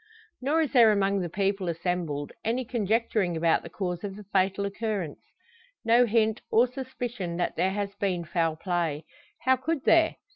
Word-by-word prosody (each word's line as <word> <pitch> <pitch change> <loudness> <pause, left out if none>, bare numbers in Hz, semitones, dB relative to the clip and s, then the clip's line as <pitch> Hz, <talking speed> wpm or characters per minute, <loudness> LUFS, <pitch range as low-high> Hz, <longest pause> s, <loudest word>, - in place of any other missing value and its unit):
Nor 295 +5 +2
is 295 - -3
there 235 -4 +7
among 200 -1 +1
the 175 -2 -3
people 195 0 -1
assembled 165 -4 -2
any 245 +3 -1
conjecturing 220 -5 0
about 165 0 +2
the 170 - -10
cause 180 0 -4
of 195 -2 -5
the 210 - -10
fatal 195 0 0
occurrence. 200 -6 -3 0.6
No 235 +2 +5
hint, 220 -1 +2
or 235 +2 +5
suspicion, 245 -8 -5
that 175 - -1
there 185 - +2
has 200 0 -3
been 185 -4 -2
foul 165 -1 0
play. 165 -3 -2 0.4
How 260 0 +3
could 280 +2 -2
there? 325 -1 +4
200 Hz, 170 wpm, -27 LUFS, 175-230 Hz, 0.6 s, there